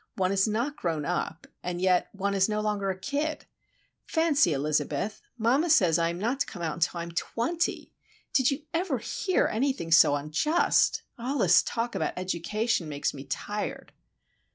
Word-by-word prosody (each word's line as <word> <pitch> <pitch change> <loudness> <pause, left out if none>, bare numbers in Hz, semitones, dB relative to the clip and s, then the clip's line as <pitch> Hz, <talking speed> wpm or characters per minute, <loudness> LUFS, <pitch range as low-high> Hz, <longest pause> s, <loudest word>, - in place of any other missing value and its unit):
One 185 -1 +1
is 195 +1 +2
not 235 +8 -1
grown 160 -4 -2
up, 175 -1 -3 0.2
and 175 -1 -4
yet 185 -1 +2
one 200 0 -2
is 195 +1 +2
no 210 0 0
longer 210 -2 -1
a 190 - -2
kid. 290 +8 -3 0.6
Fancy, 320 - +3
Elizabeth! 150 +6 -1 0.2
mamma 255 +9 +2
says 180 - +4
I 165 0 +2
am 170 - -4
not 235 +8 -1
to - - 0
come 175 -4 -7
out 165 +1 -3
till 175 +1 +1
I - - -3
am 170 - -7
twenty! 245 - -2 0.4
Did 260 -2 +4
you 280 +1 -3
ever 330 -4 0
hear 370 - 0
anything 260 -7 -1
so 155 -3 +7
unjust? 155 - +2 0.2
All 260 +5 -2
this 185 -6 +5
talk 235 +1 -3
about - - -1
education 185 +1 -1
makes 145 -1 -2
me 135 0 -9
tired." 205 +10 -4
200 Hz, 175 wpm, -28 LUFS, 170-260 Hz, 0.6 s, so